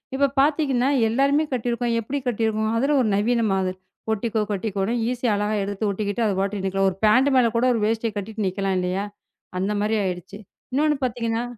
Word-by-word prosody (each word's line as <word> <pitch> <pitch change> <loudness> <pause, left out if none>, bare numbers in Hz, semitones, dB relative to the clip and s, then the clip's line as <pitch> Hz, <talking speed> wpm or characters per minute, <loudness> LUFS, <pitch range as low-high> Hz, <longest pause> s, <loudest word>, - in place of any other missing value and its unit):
இப்போ 280 +1 +3
பார்த்தீங்கன்னா, 275 -3 +2 0.2
எல்லாருமே 275 +6 +2
கட்டிருக்கோம். 240 -1 -1
எப்படி 270 +6 -3
கட்டிருக்கோம்? 220 -2 0
அதில் 280 +5 +2
ஒரு 245 - +2
நவீன 230 +4 +1
மாதிரி. 185 -1 -1 0.3
ஒட்டிக்கோ 220 +1 -1
கட்டிக்கோன்னு 200 +1 -1 0.2
ஈஸி 250 0 -4
யாக 215 - +2
அழகா 210 +1 -1
எடுத்து 200 +2 -2
ஒட்டிக்கிட்டு 205 +2 -2
அது 205 - +1
பாட்டுக்கு 195 0 -2
நிற்கலாம். 195 0 +1
ஒரு 185 - -8
பேண்ட் 255 +6 +5
மேலே 250 -2 +5
கூட 235 +2 +2
ஒரு 230 - 0
வேஷ்டியை 225 +1 0
கட்டிட்டு 215 +2 -5
நிற்கலாம் 195 +1 -1
இல்லையா? 180 +2 -1 0.5
அந்த 190 +3 -1
மாதிரி 210 +2 +1
ஆகிவிட்டது. 185 +2 -5 0.3
இன்னொன்று 300 +2 +2
பார்த்தீங்கன்னா 230 -2 -1
220 Hz, 175 wpm, -23 LUFS, 200-245 Hz, 0.5 s, பேண்ட்